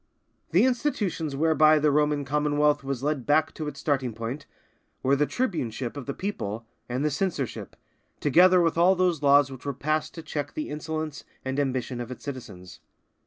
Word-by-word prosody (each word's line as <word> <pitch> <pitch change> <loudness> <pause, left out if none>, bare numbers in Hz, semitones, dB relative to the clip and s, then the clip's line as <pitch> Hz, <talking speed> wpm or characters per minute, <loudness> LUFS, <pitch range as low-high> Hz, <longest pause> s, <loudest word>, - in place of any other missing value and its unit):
The 185 +9 +4
institutions 210 - -1
whereby 155 +1 +5
the 150 0 +3
Roman 150 0 +1
Commonwealth 150 +1 +1
was 135 -2 -4
led 145 -4 -1
back 155 +2 +3
to 155 - -5
its 140 -1 -6
starting 130 -6 -1
point, 115 +6 -5 0.6
were 135 +2 +4
the 150 +1 +1
tribuneship 135 - -2
of 140 -3 -7
the 140 - -2
people 115 - -4 0.2
and 125 +4 -1
the 150 - +1
censorship, 140 - -3 0.4
together 180 +5 +5
with 165 -1 +1
all 185 +3 +5
those 180 -4 +1
laws 140 -1 +5
which 130 -1 -10
were 140 - -2
passed 155 +3 -1
to 165 - -7
check 145 -2 -4
the 305 - -3
insolence 155 0 -4 0.2
and 130 +1 -2
ambition 130 -3 -2
of 120 - -6
its 130 - -9
citizens. 95 -10 -8
145 Hz, 175 wpm, -26 LUFS, 135-160 Hz, 0.6 s, whereby